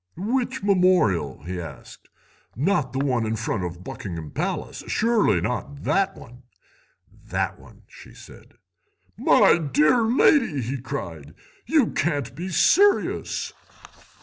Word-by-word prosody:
"'Which 245 +5 -2
memorial?' 180 - +2
he 90 +2 -5
asked; 75 -6 -11 0.5
'not 150 - 0
the 135 - -5
one 125 -4 +1
in 110 0 -1
front 110 -3 -3
of 90 0 -6
Buckingham 85 -6 -7
Palace? - - -4
Surely 220 - +2
not 125 +7 -4
that 195 0 +1
one?' 125 +2 -14 0.8
"'That - - -2
one,' - - -18
she - - -15
said. - - -15 0.6
"'My - - +4
dear 150 - +3
lady,' 230 - +3
he 130 +2 -4
cried, 80 - -7 0.3
'you 290 -3 +3
can't 145 -6 -1
be 180 +3 -5
serious. 400 - +2
140 Hz, 120 wpm, -24 LUFS, -, 0.8 s, My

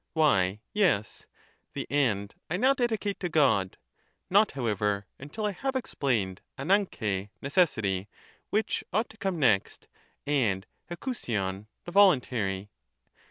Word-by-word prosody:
Why 105 - +3
yes, 170 - +1 0.5
the - - -3
end 110 -8 +1 0.2
I 175 - 0
now 260 +6 +4
dedicate 225 -6 -1
to' 180 - -2
God, 135 - +2 0.5
not, 205 +2 +4
how 130 -3 -3
ever, 105 -2 0
until 150 +11 -5
I 210 - +1
have 265 +8 -3
explained 115 - -1 0.2
dvdynT] 135 - 0
(necessity), 110 - +1 0.4
which 215 +2 0
ought 220 +4 0
to 220 - -18
come 190 -4 -2
next, 115 -10 +1 0.4
and 115 -10 +1 0.2
eiiovaiov 105 - -3 0.2
(the 175 - -6
voluntary'). 125 - +3
140 Hz, 120 wpm, -28 LUFS, -, 0.5 s, now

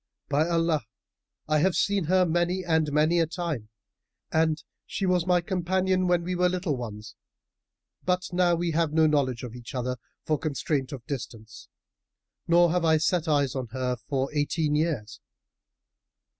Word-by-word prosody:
By 150 +4 +2
Allah, 165 -2 +2 0.7
I 155 0 +2
have 185 +3 +2
seen 200 -4 +1
her 185 +3 +4
many 175 +2 0
and 160 -3 +1
many 155 +4 +3
a 165 - +2
time 160 - -4 0.6
and 160 -1 +1 0.2
she 195 - -2
was 180 -1 +1
my 180 -1 +4
companion, 185 +1 0
when 175 -1 +2
we 180 +2 -2
were 180 0 +2
little 180 -4 -1
ones; 110 -3 -7 0.9
but 180 0 +1
now 175 -1 +3
we 170 0 -1
have 160 -1 0
no 160 0 +5
knowledge 135 -6 +1
of 120 -2 -6
each 125 +3 -9
other, 125 0 -2 0.3
for 155 -2 +1
constraint 140 -2 -2
of 130 -5 -8
distance; 110 -6 -7 0.8
nor 170 0 +5
have 180 0 +1
I 160 -1 +4
set 165 +1 +1
eyes 145 -4 +2
on 130 -2 -3
her 130 -1 -1
for 135 +3 -3
eighteen 150 +1 0
years. 125 -9 -1
160 Hz, 160 wpm, -27 LUFS, 135-175 Hz, 0.9 s, no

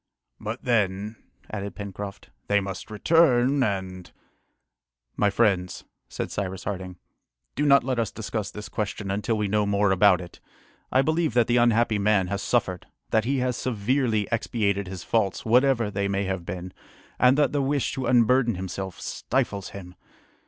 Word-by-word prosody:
"But 110 +3 -5
then," 105 -3 0 0.4
added 100 -1 -5
Pencroft, 100 -1 -7 0.2
"they 100 0 +3
must 95 -1 -6
return, 135 +2 +3
and 95 -5 -2 0.5
" - - -56
"My 105 - +2
friends," 100 -4 +1 0.3
said - - -4
Cyrus 95 -2 -4
Harding, 95 -3 -5 0.6
"do 145 - 0
not 140 0 +6
let 130 -1 -1
us 115 -3 0
discuss 110 -2 -4
this 105 0 -8
question 105 -1 -3
until 105 +3 -1
we 105 -1 0
know 105 0 +1
more 100 0 +2
about 95 -1 +5
it. 90 -1 -10 0.5
I 130 - +4
believe 155 -3 0
that 120 -2 +5
the 120 +1 +2
unhappy 120 -2 +3
man 100 -3 +2
has 100 0 -2
suffered, 95 -7 -1 0.2
that 110 -1 +2
he 135 +3 0
has 125 -1 0
severely 115 -2 0
expiated 100 -4 0
his 90 -2 -7
faults, 110 -4 0
whatever 120 -1 +3
they 100 0 -1
may 100 0 -1
have 95 -3 -3
been, 90 0 -6 0.5
and 125 +2 +5
that 150 - +3
the 145 - 0
wish 140 0 0
to 130 - -3
unburden 120 -1 +3
himself 95 0 -5
stifles 110 -7 -2
him. 90 -2 -10
105 Hz, 165 wpm, -25 LUFS, 95-120 Hz, 0.6 s, not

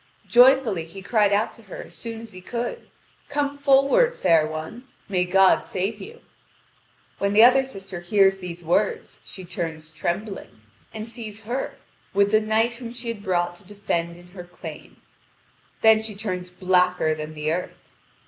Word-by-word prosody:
Joyfully 245 -8 +5
he 190 +4 -11
cried 210 -2 +2
out 205 +2 +1
to - - -16
her 200 -4 -9
as - - -16
soon 230 -1 -7
as 230 -3 -11
he 185 - -10
could: 240 - -5 0.4
"Come 285 0 -1
forward, 280 - +3
fair 165 -4 +4
one: 155 +11 -7 0.2
may 185 -3 +1
God 190 +1 +4
save 195 +3 -3
you!" 465 +3 -11 1.0
When 200 0 0
the 215 +2 +7
other 255 +2 +7
sister 195 -8 -8
hears 195 +1 +3
these 175 -1 -7
words, 185 +5 0
she 185 - -10
turns 160 -3 -5
trembling, 175 - -4 0.3
and 220 0 -6
sees 220 -2 -7
her 240 +5 -4 0.4
with 200 0 +3
the 215 0 +4
knight 220 +2 +1
whom 235 -1 -8
she 240 -1 -6
had 225 -3 -4
brought 175 -3 0
to - - -19
defend 175 -4 -3
in 175 0 -16
her 180 0 -9
claim: 175 0 -11 0.8
then 220 -1 +6
she 220 -2 -6
turned 185 -3 -4
blacker 180 -3 +3
than 155 0 -7
the 150 +1 -1
earth. 180 +1 -4
200 Hz, 165 wpm, -24 LUFS, 180-230 Hz, 1.0 s, the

